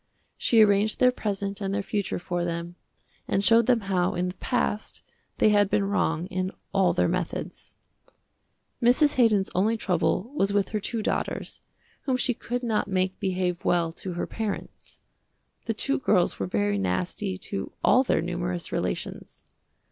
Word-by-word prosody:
She 225 -2 +5
arranged 205 +1 +3
their 250 0 +5
present 200 -4 -3
and 195 -1 -2
their 200 0 -1
future 205 -1 -2
for 175 0 -3
them, 170 0 -4 0.5
and 200 - +1
showed 230 +2 +5
them 245 -3 +3
how 185 -3 0
in 180 +1 -1
the 180 - -7
past 220 -3 -2 0.3
they - - +4
had 205 -1 +4
been 200 - +2
wrong 170 -5 0
in 185 0 -1 0.2
all 190 -3 +4
their 175 - +2
methods. 175 0 -4 1.1
Mrs. 255 +5 +4
Haydon's 215 -6 +3
only 215 +5 +2
trouble 185 +3 0
was 200 -9 +1
with 200 -1 +1
her 215 - -1
two 220 +2 -3
daughters, - - -3 0.4
whom 260 -2 +1
she 250 0 +2
could 245 +2 -4
not 220 -4 0
make 185 -1 -1
behave 185 -3 -1
well 170 -2 +2
to 180 +2 -7
her 175 - -2
parents. 220 -3 -6 0.7
The 225 - -1
two 275 +6 0
girls 190 -8 +2
were 95 - -1
very 100 +1 0
nasty 90 0 -2
to 95 +1 -5
all 255 - +5
their 265 - +1
numerous 175 0 -3
relations. - - -4
195 Hz, 165 wpm, -26 LUFS, 175-220 Hz, 1.1 s, She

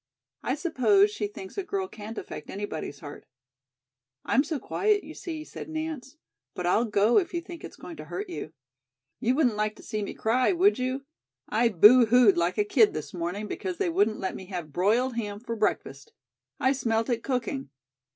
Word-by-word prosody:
I 260 - -1
suppose 390 +6 +3
she 415 0 -2
thinks 400 0 -8
a - - -2
girl 380 0 -2
can't 220 - -9
affect 150 - -7
anybody's 195 -7 -5
heart." 145 -2 -10 1.0
"I'm 270 - +3
so 310 -1 -3
quiet, 410 +8 +1
you - - -9
see," 320 -3 -6
said 315 - -9
Nance, 315 -3 -5 0.4
"but 180 - -4
I'll 210 +7 +3
go 210 - +4
if 360 -2 -4
you 340 - -1
think 340 -1 -10
it's - - -9
going 335 - -10
to - - -8
hurt 405 - -5
you." 345 - -6 0.7
"You 250 +3 +1
wouldn't 250 -8 +2
like 210 0 0
to - - -15
see 215 - -3
me 200 - -5
cry, 250 +8 +2
would 370 -2 +3
you? 255 +2 -2 0.4
I 230 +2 +3
boohooed 230 +2 +7
like 175 +1 0
a 210 - +4
kid 215 +1 +4
this 150 -2 -5
morning 180 +4 -3
because 185 -3 -4
they 175 - 0
wouldn't 205 +5 +2
let 190 -2 -3
me 190 - -9
have 175 -6 -6
broiled 230 - +2
ham 205 -3 -3
for 230 0 -5
breakfast. 225 - -2 0.5
I 260 - +3
smelt 225 -4 0
it 235 -2 0
cooking. 270 +1 -2
235 Hz, 190 wpm, -27 LUFS, 205-315 Hz, 1.0 s, boohooed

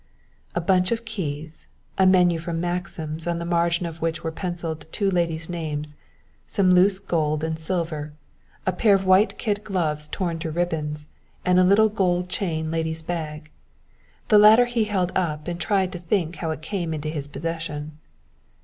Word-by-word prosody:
A 175 - +1
bunch 180 +2 +2
of 230 0 -1
keys, 160 -8 -5 0.3
a 190 - +4
menu 180 -3 +4
from 165 0 -3
Maxim's 175 -2 -3
on 170 -1 0
the 170 - -4
margin 170 0 +1
of 165 -1 -7
which 165 0 -2
were 160 - -2
pencilled 165 -3 -5
two 200 -3 +1
ladies' 165 -2 0
names 150 -3 -4 0.5
some 190 -2 +3
loose 185 +2 +5
gold 155 -5 -1
and 160 0 -2
silver 160 -3 -2 0.5
a 185 - +1
pair 205 +2 +4
of 195 0 -1
white 190 +4 +4
kid 210 -3 -1
gloves 155 -7 -1
torn 170 -2 -2
to 160 - -3
ribbons, 155 -3 -2 0.4
and 180 0 +4
a - - +6
little 205 +4 +5
gold 180 -4 0
chain 160 -5 -2
lady's 160 0 -2
bag. 155 -3 -5 0.8
This 210 - +7
latter 220 +4 +8
he 240 -2 0
held 185 -4 0
up 155 -4 -1
and 175 0 -4
tried 190 +2 +1
to 180 - -6
think 175 -1 -1
how 165 - -3
it 155 0 -4
came 170 -2 -2
into 155 0 -4
his 145 -3 -4
possession. 155 -1 -5
170 Hz, 175 wpm, -24 LUFS, 160-185 Hz, 0.8 s, latter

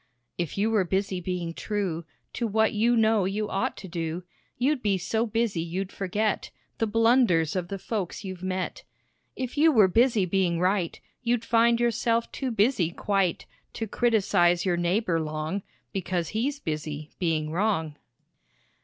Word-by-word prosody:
"If 170 -1 -3
you 215 +3 +2
were 215 -3 +3
busy 190 0 -1
being 175 -1 -3
true 185 -5 -3 0.3
To 235 - -1
what 220 +1 +2
you 230 +3 +3
know 220 -3 +3
you 205 +3 -1
ought 195 - -1
to 190 - -8
do, 170 0 -3 0.3
You'd 265 +2 +1
be 200 -4 +2
so 220 +6 -1
busy 225 -5 0
you'd 185 +4 -3
forget 205 +2 -1 0.3
The 225 - +1
blunders 225 - +3
of 180 -2 -1
the 195 - -4
folks 200 -1 -4
you've 185 -2 -6
met. 185 0 -3 0.5
"If 255 +2 -4
you 320 +1 +6
were 215 -8 +6
busy 225 +1 +3
being 180 -2 +1
right, 185 -1 0 0.2
You'd 240 -1 0
find 235 0 +4
yourself 235 0 +1
too 265 - -3
busy 220 -5 +2
quite 195 0 0 0.3
To 225 - -3
criticize 195 -7 +2
your 180 -2 +2
neighbor 175 0 +1
long 155 +5 -3 0.3
Because 180 -3 -2
he's 270 +6 -1
busy 155 - -4
being 155 -3 0
wrong." 165 -5 0
195 Hz, 155 wpm, -27 LUFS, 175-225 Hz, 0.5 s, you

